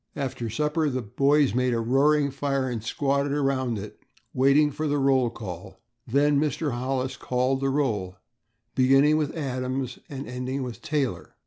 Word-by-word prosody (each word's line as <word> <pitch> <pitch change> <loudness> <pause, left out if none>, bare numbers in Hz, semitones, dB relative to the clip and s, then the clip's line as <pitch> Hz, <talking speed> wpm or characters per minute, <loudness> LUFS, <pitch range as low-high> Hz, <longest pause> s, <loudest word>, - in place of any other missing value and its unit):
After 130 -5 -3
supper 150 +5 0
the 130 -2 -3
boys 140 +6 +2
made 125 0 +1
a - - 0
roaring 140 +5 +3
fire 135 -1 -1
and 120 -4 -4
squatted 140 +3 0
around 135 -5 0
it, 105 +1 -8 0.3
waiting 140 +3 +4
for 155 +2 -3
the 145 0 +1
roll 135 -3 +3
call. 95 -5 -8 0.3
Then 140 +3 +3
Mr. 150 0 -1
Hollis 130 +1 -2
called 130 +1 0
the 135 - +1
roll, 110 -10 -1 0.6
beginning 135 +3 +4
with 155 +1 -2
Adams 130 -2 -3
and 140 0 -6
ending 125 +2 -3
with 125 -2 -7
Taylor. 145 -5 -2
135 Hz, 155 wpm, -26 LUFS, 125-145 Hz, 0.6 s, waiting